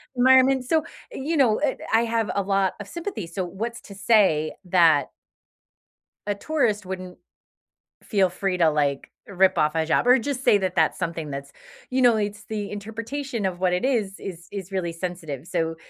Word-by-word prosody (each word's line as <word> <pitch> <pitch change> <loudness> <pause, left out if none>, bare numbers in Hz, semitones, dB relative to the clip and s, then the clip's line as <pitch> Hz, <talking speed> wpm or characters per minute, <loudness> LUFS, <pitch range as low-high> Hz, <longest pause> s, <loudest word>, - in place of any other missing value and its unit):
environment. 260 +1 +5
So, 320 +3 +2 0.3
you 315 - -3
know, 235 -6 +4
eh, 285 -2 +1 0.2
I 225 - +5
have 225 -3 -1
a 200 - +1
lot 195 -1 +1
of 200 - -7
sympathy. 340 - -5
So, 185 +3 -4
what's 225 +7 -5
to 200 - -12
say, 195 -8 +3
that 165 -6 +4 1.2
a 205 - 0
tourist 215 -6 -1
wouldn't 185 -1 -7 0.8
feel 195 -4 +2
free 185 0 -2
to, 165 -3 +4
like, 145 -2 -1 0.2
rip 190 -1 +2
off 150 +1 +2
a 165 - 0
hijab 160 0 +1
or 250 +1 +6
just 270 +1 -3
say 205 - +5
that 185 -2 -2
that's - - +2
something 165 -4 -3
that's 140 0 -6 0.4
you 255 0 0
know, 240 -2 +5
it's 205 0 -3
the 210 -2 -4
interpretation 230 +3 -4
of 180 -1 -3
what 185 -1 +1
it 180 - 0
is, 220 -7 -1
is 175 -2 -8
is 195 -2 -6
really 185 -3 -2
sensitive. 165 -5 -6
So 165 -2 -2
195 Hz, 180 wpm, -24 LUFS, 175-230 Hz, 1.2 s, or